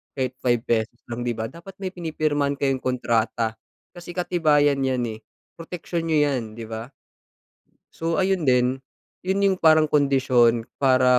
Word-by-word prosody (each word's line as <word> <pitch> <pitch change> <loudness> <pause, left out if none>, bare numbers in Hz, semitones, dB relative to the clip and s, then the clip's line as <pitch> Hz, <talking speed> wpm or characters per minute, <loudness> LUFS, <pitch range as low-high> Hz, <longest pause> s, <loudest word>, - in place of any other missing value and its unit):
kahit 130 -2 -1
₱5 120 -1 0
lang, 120 +1 -4
'di 120 - +1
ba? 110 0 -4
Dapat 170 +3 -12
may 190 - -2
pinipirmahan 155 -5 -1
kayong 135 -1 0
kontrata, 115 -3 0 0.4
kasi 175 0 -9
katibayan 150 -6 +2
'yan 130 -1 0
eh, 110 - -7 0.4
proteksiyon 170 0 -4
niyo 160 -2 +2
'yan, 130 -4 0
'di 115 0 -7
ba? 115 +4 -6 1.0
So, 165 +3 0
ayun 190 -4 +1
din, 125 0 +3 0.5
yun 195 +2 +1
yung 195 -1 +3
parang 155 -2 +5
kondisyon 130 -5 +3 0.2
para 130 -2 +4
135 Hz, 145 wpm, -24 LUFS, 120-165 Hz, 1.0 s, parang